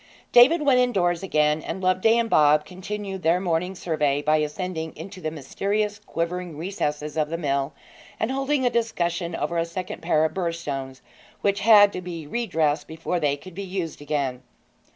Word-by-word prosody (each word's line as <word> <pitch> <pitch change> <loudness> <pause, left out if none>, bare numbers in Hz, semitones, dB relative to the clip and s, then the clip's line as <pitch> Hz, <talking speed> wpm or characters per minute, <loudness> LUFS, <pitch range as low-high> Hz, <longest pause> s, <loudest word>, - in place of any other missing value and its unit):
David 290 +7 +7
went 270 -3 +4
indoors 180 -9 +1
again, 150 -4 +1
and 180 - -5
Loveday 185 +5 +3
and 235 -1 +1
Bob 150 -5 +4
continued 195 +1 -6
their 170 +2 +3
morning 180 +1 -1
survey 150 -5 0
by 155 +1 +3
ascending 160 +2 -3
into 185 +4 -9
the 155 - -2
mysterious 205 +8 -2
quivering 175 -4 -4
recesses 150 -4 -3
of 150 -1 +1
the 165 - -2
mill, 140 -3 -1 0.5
and 220 - 0
holding 270 0 0
a 245 - +3
discussion 175 -7 -1
over 170 0 -1
a - - +2
second 180 +1 -6
pair 160 -2 +2
of 160 - -2
burr 175 -3 -1
stones, 135 -5 -5 0.4
which 200 0 +1
had 205 -1 +7
to 180 - -4
be 170 -3 -6
re 235 +10 -3
dressed 155 -4 0
before 165 +2 -3
they 145 -3 +1
could 185 +5 -12
be 195 - -6
used 185 -5 -4
again. 140 -4 -2
175 Hz, 180 wpm, -24 LUFS, 155-200 Hz, 0.5 s, David